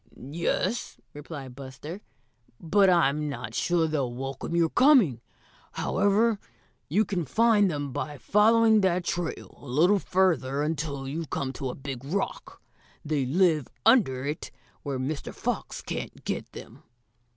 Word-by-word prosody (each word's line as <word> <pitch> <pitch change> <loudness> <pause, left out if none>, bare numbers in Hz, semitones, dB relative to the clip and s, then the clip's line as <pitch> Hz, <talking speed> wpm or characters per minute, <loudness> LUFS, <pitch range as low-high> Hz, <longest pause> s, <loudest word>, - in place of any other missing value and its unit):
"Yes," 170 - -2 0.2
replied 145 -4 -8
Buster, 140 +7 -8 0.6
"but 195 +4 +3
I'm 150 -4 +2
not 115 -6 -6
sure 170 +5 +1
they'll 140 -6 -1
welcome 135 +5 -5
your 165 -1 +2
coming. 240 - +5 0.5
However, 205 +2 +2 0.5
you 205 +9 +3
can 180 -4 -2
find 210 - +3
them 145 -4 -3
by 150 +2 -4
following 220 - +4
that 185 -1 +1
trail 170 -1 -4
a 140 - -12
little 170 +11 +3
further 150 -8 +1
until 150 -3 -3
you 160 +4 -4
come 135 -1 -3
to 135 -2 -4
a - - -5
big 135 -2 -7
rock. 190 +8 -4 0.4
They 145 -4 0
live 160 -2 +2 0.2
under 190 - +4
it 150 +2 -4 0.3
where 140 -2 -3
Mr. 140 +3 -4
Fox - - -3
can't - - -6
get - - -3
them." - - -11
155 Hz, 140 wpm, -27 LUFS, 135-190 Hz, 0.6 s, coming